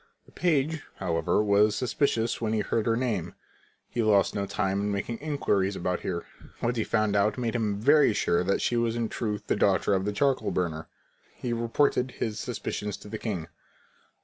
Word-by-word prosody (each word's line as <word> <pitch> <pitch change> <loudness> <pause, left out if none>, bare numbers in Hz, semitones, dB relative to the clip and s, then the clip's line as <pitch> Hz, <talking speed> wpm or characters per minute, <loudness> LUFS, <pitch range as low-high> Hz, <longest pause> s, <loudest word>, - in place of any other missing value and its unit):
The - - -20
page, 160 -2 +1
however, 85 +2 +1
was 105 +1 +4
suspicious 120 -1 0
when 110 -1 0
he 110 - +1
heard 110 +2 -1
her 115 - +3
name. 110 -9 -2 0.5
He 120 - -2
lost 105 -3 +3
no 100 -1 -2
time 95 +1 -1
in 105 0 -1
making 100 +4 -3
inquiries 105 -10 0
about 90 0 -1
her. 85 -2 -4 0.3
What 120 +1 0
he 115 - 0
found 110 -2 +1
out 100 +3 +2
made 120 -2 -1
him 105 -4 -1
very 145 +4 +5
sure 90 -4 +1
that 100 +2 0
she 120 - +1
was 115 -1 +1
in 115 -2 -1
truth 105 -3 -3
the - - +1
daughter - - +2
of 95 0 +1
the 105 - 0
charcoal 135 +5 +1
burner. 80 -3 -2 0.5
He 120 -2 -3
reported 120 +3 +1
his 110 -1 -2
suspicions 105 -3 -4
to 105 - -12
the 110 +1 -5
king. 95 -8 -3
110 Hz, 190 wpm, -27 LUFS, 100-120 Hz, 0.5 s, very